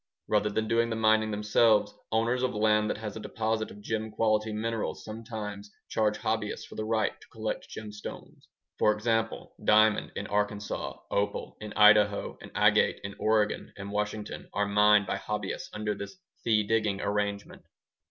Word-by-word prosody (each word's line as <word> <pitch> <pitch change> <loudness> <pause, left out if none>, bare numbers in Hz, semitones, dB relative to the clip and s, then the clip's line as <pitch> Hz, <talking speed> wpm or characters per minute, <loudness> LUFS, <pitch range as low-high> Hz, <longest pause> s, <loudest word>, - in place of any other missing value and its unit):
Rather 105 0 +2
than 110 +1 -1
doing 115 +1 +2
the 115 - -1
mining 110 0 +3
themselves, 105 +1 +3 0.2
owners 115 +3 +1
of 130 -3 0
land 105 0 +3
that - - -1
has 105 -1 -6
a - - -5
deposit 110 +1 -2
of 105 - -12
gem 110 +1 -2
quality 110 0 +1
minerals 115 +1 -3
sometimes 110 -2 -6 0.2
charge 110 -1 +1
hobbyists 110 -1 -2
for - - -13
the 110 - -4
right 110 0 0
to - - -16
collect - - -4
gemstones. 105 -1 -9 0.3
For 105 - +5
example, 110 +1 -1
diamond 110 0 +4
in - - -3
Arkansas, 105 0 -2
opal 100 0 -1
in 105 0 -6
Idaho, 105 -1 +5
and - - -10
agate - - +4
in 100 0 -5
Oregon 110 -1 +1
and 100 0 -6
Washington 105 0 -3
are 100 - +1
mined 105 0 +5
by - - -2
hobbyists 105 -2 -4
under 105 0 -2
this 100 - -8 0.3
ŌĆ£fee 105 -2 +3
diggingŌĆØ 105 -3 +1
arrangement. 100 0 -2
105 Hz, 160 wpm, -29 LUFS, 105-110 Hz, 0.3 s, For